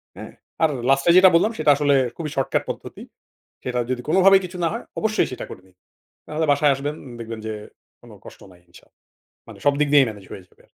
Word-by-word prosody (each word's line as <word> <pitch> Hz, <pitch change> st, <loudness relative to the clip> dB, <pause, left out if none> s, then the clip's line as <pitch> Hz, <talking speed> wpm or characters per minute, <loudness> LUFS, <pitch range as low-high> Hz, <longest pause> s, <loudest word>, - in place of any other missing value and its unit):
হ্যাঁ, -, -, -10 dB, 0.3 s
আর 160 Hz, -, +4 dB, 0.2 s
last 135 Hz, 0 st, +2 dB
এ -, -, +8 dB
যেটা 185 Hz, 0 st, +8 dB
বললাম 215 Hz, +6 st, +3 dB
সেটা 150 Hz, -, +3 dB
আসলে 145 Hz, 0 st, +1 dB, 0.2 s
খুবই 160 Hz, -2 st, -5 dB
শর্টকাট 135 Hz, -, -1 dB
পদ্ধতি। -, -, -7 dB, 0.6 s
সেটা 125 Hz, -1 st, -2 dB
যদি 125 Hz, -1 st, -2 dB
কোনোভাবেই 190 Hz, +2 st, +5 dB
কিছু 180 Hz, 0 st, -9 dB
না -, -, +3 dB
হয়, 230 Hz, -, -5 dB, 0.2 s
অবশ্যই 220 Hz, 0 st, 0 dB
সেটা 125 Hz, -, -6 dB
করবেন। 95 Hz, 0 st, -14 dB, 0.5 s
নাহলে 155 Hz, +1 st, -2 dB
বাসায় 145 Hz, 0 st, +3 dB
আসবেন, 145 Hz, +3 st, -4 dB, 0.2 s
দেখবেন 115 Hz, -1 st, -7 dB
যে 110 Hz, -, -3 dB, 0.5 s
কোনো -, -, -15 dB
কষ্ট -, -, -13 dB
নাই 90 Hz, -1 st, -20 dB
ইনশাল্লাহ। 85 Hz, -, -21 dB, 0.5 s
মানে -, -, -12 dB
সবদিক 145 Hz, +1 st, +2 dB
দিয়েই 140 Hz, -3 st, +6 dB
manage 100 Hz, -3 st, -13 dB
হয়ে 95 Hz, -, -10 dB
যাবে। -, -, -26 dB
145 Hz, 195 wpm, -22 LUFS, 125-165 Hz, 0.6 s, এ